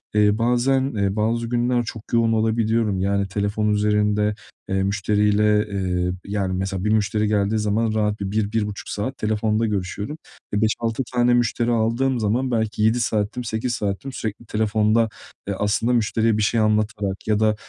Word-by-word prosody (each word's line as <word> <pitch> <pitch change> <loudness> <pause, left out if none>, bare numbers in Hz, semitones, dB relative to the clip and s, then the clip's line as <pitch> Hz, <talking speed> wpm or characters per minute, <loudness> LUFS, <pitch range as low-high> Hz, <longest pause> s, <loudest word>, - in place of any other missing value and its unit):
eee, 105 0 +4
bazen, 125 +3 +1
eee, 100 -1 0
bazı 115 +2 0
günler 120 0 +1
çok 115 -1 -7
yoğun 115 -1 +3
olabiliyorum; 110 -2 +1
yani 100 +1 0
telefon 105 +2 -1
üzerinde, 105 0 +1 0.3
eee, 95 0 +1
müşteriyle, 105 +1 +2
eee, 90 -3 -1
yani 100 -2 -2
mesela 95 0 -3
bir - - +2
müşteri 105 0 +1
geldiği 105 0 +1
zaman 110 +1 0
rahat 105 -1 0
bir 100 -1 -3
1-1,5 105 -1 -2
saat 130 +6 -3
telefonda 110 +1 0
görüşüyorum. 105 - -3 0.4
E, 105 - +1
5-6 115 +3 0
tane 120 0 +3
müşteri 120 0 +1
aldığım 120 +3 +1
zaman 120 +5 0
belki 110 -2 -1
7 110 +3 +3
saatim, 110 +1 -1
8 115 +2 -2
saatim 105 +4 -3
sürekli 110 -2 -5
telefonda, 110 +1 +1 0.4
eee, 100 - -1
aslında 105 +4 +1
müşteriye 110 -1 +1
bir - - 0
şey 115 +2 +1
anlatarak 105 -2 0
ya 105 -1 +2
da 110 -1 +3
110 Hz, 160 wpm, -22 LUFS, 105-115 Hz, 0.4 s, eee